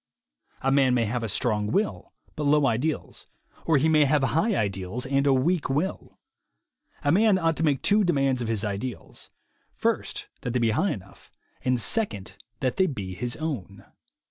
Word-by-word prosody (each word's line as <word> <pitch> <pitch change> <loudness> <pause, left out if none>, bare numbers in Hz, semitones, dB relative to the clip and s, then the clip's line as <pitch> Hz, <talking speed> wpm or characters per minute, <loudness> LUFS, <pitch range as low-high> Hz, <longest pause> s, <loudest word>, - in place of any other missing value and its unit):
A 135 - +2
man 135 -2 +4
may 115 -2 +2
have 120 +3 -2
a 115 - -3
strong 105 -1 0
will 200 - -1 0.2
but 150 - -3
low 145 0 +4
ideals, 135 +6 -2 0.4
or 160 -3 +4
he 145 +4 +2
may 155 -2 +5
have 145 0 +2
high 165 - +1
ideals 100 - -2
and 140 +1 +1
a - - +5
weak 145 +5 +1
will. 150 +8 -2 0.9
A 145 - +3
man 205 +3 +4
ought 165 -3 +1
to - - -1
make 145 -4 +1
two 210 +1 +3
demands 135 -7 +1
of 120 - -2
his 110 -2 -1
ideals: 105 +5 -6 0.5
first - - -2
that 125 - -3
they 125 - +1
be 115 -2 +2
high 185 - +1
enough, 95 -2 -8 0.3
and 125 -1 +1
second 115 - -1 0.3
that 130 -2 -1
they 190 -1 +4
be 100 - -5
his 120 +5 -4
own. 105 - -5
135 Hz, 180 wpm, -26 LUFS, 115-160 Hz, 0.9 s, may